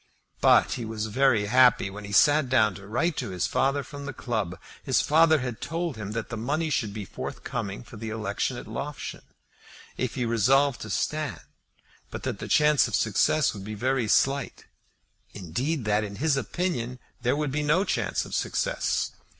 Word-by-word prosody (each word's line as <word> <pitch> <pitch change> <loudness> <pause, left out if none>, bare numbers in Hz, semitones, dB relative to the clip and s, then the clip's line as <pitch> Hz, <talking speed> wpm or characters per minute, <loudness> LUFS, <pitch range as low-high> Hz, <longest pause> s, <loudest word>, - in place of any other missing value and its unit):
But - - +5
he 120 - -3
was 110 -1 -3
very 115 -1 +2
happy 125 -3 +4
when 105 +1 -8
he 100 - -8
sat 145 +5 +4
down 110 -5 +4
to 95 +2 -11
write 160 +10 0
to - - -3
his 90 -2 -1
father 140 +1 +1
from 145 0 -9
the 145 - -4
club. 110 -9 -3 0.2
His - - +2
father 160 -1 +4
had 125 -3 -5
told 165 -3 -3
him 105 -1 -6
that 115 -1 -4
the 115 - -4
money 150 +8 -1
should 110 -7 0
be 105 -1 -6
forthcoming 100 +2 -5
for 115 - -12
the 110 +1 -5
election 110 0 -2
at - - -7
Loughshane, - - -6 0.8
if 130 -2 -2
he 125 -3 -1
resolved 125 +4 +3
to 110 - -6
stand, 150 +8 -2 0.7
but - - -7
that - - -3
the - - -5
chance 150 -2 +4
of 110 - -1
success 120 +7 +2
would 100 -3 -8
be 105 +2 -6
very 125 +1 0
slight, 135 +4 +1 0.7
indeed 120 - -3
that, 105 0 +2
in 100 -1 -6
his 150 +5 +1
opinion, 135 -5 -2 0.2
there 125 +3 +1
would 150 -2 -1
be 150 +2 -1
no 155 +6 +3
chance - - -1
of - - -10
success. - - -1
125 Hz, 185 wpm, -26 LUFS, 105-145 Hz, 0.8 s, But